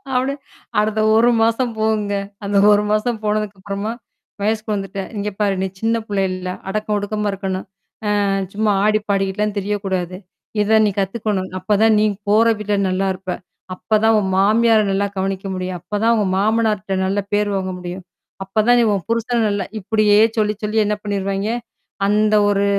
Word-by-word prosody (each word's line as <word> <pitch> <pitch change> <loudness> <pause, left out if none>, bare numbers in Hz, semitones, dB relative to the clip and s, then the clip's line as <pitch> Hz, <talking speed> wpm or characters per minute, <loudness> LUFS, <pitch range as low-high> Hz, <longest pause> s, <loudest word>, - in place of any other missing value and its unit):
அப்பிடி 260 +2 +1 0.5
அடுத்த 215 +1 +1 0.2
1 235 +2 +5
மாசம் 230 +2 +2
போகுங்க. 215 -2 0 0.3
அந்த 200 0 0
1 205 0 +4
மாசம் 215 +2 0
போனதுக்கு 210 -1 -1
அப்புறமா 200 +2 -3 0.5
வயசுக்கு 215 +1 -1
வந்துட்டேன். 195 -1 -5
இங்க 205 +1 -2
பாரு! 200 -2 +2
நீ 190 - 0
சின்னப் 225 0 0
புள்ள 200 -1 0
இல்ல. 185 0 -6 0.2
அடக்கம் 210 +1 -1
ஒடுக்கமா 210 +1 -2
இருக்கணும். 190 -1 -4 0.6
ஆ - - +1 0.3
சும்மா 215 0 +1
ஆடிப்பாடிக்கிட்டுல 205 -1 +1
திரிய 200 +1 -1
கூடாது. 185 -2 -2 0.5
இத 220 +2 +4
நீ - - +3
கத்துக்கணும். 195 -1 -2
அப்பத் 205 +3 +1
தான் 220 -1 +5
நீ 215 - +3 0.2
போற 215 +3 +4
வீட்ல 210 0 -1
நல்லா 190 +1 0
இருப்ப! 185 0 -6 0.4
அப்பத் 215 +3 0
தான் 225 0 +5
உன் 190 -2 -1
மாமியார் 220 +2 +4
நல்லா 200 +1 +1
கவனிக்க 195 0 -2
முடியும். 185 0 -4
அப்பத் 205 +4 -4
தான் 230 +1 +4
உங்க 210 - +1
மாமனார்ட்ட 210 -2 +1
நல்ல 195 +2 0
பேர் 205 0 +2
வாங்க 190 -1 -2
முடியும். 180 +1 -7 0.4
அப்பத் 210 +3 0
தான் 245 0 +6
நீ - - +4
உன் 195 -3 -2
புருஷன் 230 0 +1
நல்லா 205 -1 -1
இப்பிடியே 210 +1 +3 0.2
சொல்லிச் 210 -1 0
சொல்லி 210 +1 -1
என்ன 210 0 0
பண்ணிடுவாங்கே, 200 +1 -2 0.5
அந்த 215 +1 +3
ஒரு 200 0 +2
210 Hz, 170 wpm, -19 LUFS, 195-215 Hz, 0.6 s, தான்